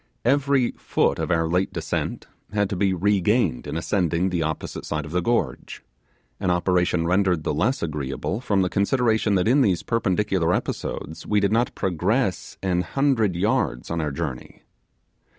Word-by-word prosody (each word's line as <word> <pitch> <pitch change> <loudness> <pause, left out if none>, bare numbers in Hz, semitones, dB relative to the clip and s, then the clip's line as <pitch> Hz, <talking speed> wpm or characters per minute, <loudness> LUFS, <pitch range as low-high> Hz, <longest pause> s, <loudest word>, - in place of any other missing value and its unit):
Every 140 -1 +3
foot - - +1
of - - -2
our 80 -2 +2
late 90 +3 0
descent - - -3 0.3
had 105 -2 +1
to - - -1
be 95 +1 +2
regained 100 - +1
in - - -3
ascending 85 0 0
the 85 -2 0
opposite 80 -1 -3
side 75 -1 -3
of 75 - -9
the 90 +1 +1
gorge 85 - -2 0.6
an - - 0
operation 90 -1 +1
rendered 90 -2 +2
the - - -1
less 120 - 0
agreeable 75 - -3
from 100 -6 +1
the 90 - 0
consideration 110 +1 +2
that 90 +2 +2
in 135 +5 +4
these 95 -9 +2
perpendicular 95 -5 +1
episodes 80 - -4
we 105 - +3
did 100 0 +1
not 115 +2 +1
progress 95 - -1
a 90 -2 +1
hundred 115 -1 +1
yards 85 - 0
on 85 0 -1
our 75 - -1
journey. 70 -3 -6
95 Hz, 165 wpm, -24 LUFS, 85-110 Hz, 0.6 s, in